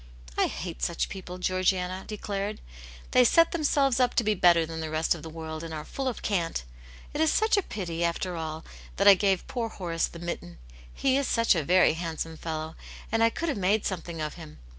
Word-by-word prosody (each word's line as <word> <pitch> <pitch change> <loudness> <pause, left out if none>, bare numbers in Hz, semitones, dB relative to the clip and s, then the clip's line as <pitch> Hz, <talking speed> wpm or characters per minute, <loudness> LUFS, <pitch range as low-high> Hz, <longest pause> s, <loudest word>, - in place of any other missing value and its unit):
^ - - +4
I - - +3
hate - - -6
such 60 - -1
people," 180 -2 -7
Georgiana 185 0 0
declared. 205 0 -4 0.3
" - - -17
They 250 - +6
set 330 +7 +5
themselves 280 -5 +2
up 250 -1 +2
to 235 - +3
be 215 0 +2
better 175 -3 +5
than 160 0 -6
the 160 -1 -3
rest 155 +1 +1
of 170 - -8
the 160 - -8
world, 160 0 -6
and 165 -1 -5
are 150 - -6
full 270 -1 -4
of 250 - -3
cant. 170 - -1 0.5
It 295 - -1
is 320 - +4
such 440 +1 +3
a 400 - +3
pity, 170 - -4
after 170 +1 -1
all, 160 -1 -5 0.3
that 200 - +2
I 200 - +12
gave 195 -1 +1
poor 235 -2 -2
Horace 170 -5 -2
the - - -11
mitten. 170 - -6 0.3
He 270 -1 +1
is 280 -2 0
such 230 0 +3
a 170 - +1
very 180 +4 +4
handsome 165 -1 -4
fellow, 160 0 -5 0.4
and 225 +1 +3
I 230 - +6
could 335 +8 -3
have 275 - -2
made 200 +3 +2
something 170 -3 -4
of 150 0 -3
him. 160 -3 -11
180 Hz, 225 wpm, -28 LUFS, 165-220 Hz, 0.5 s, I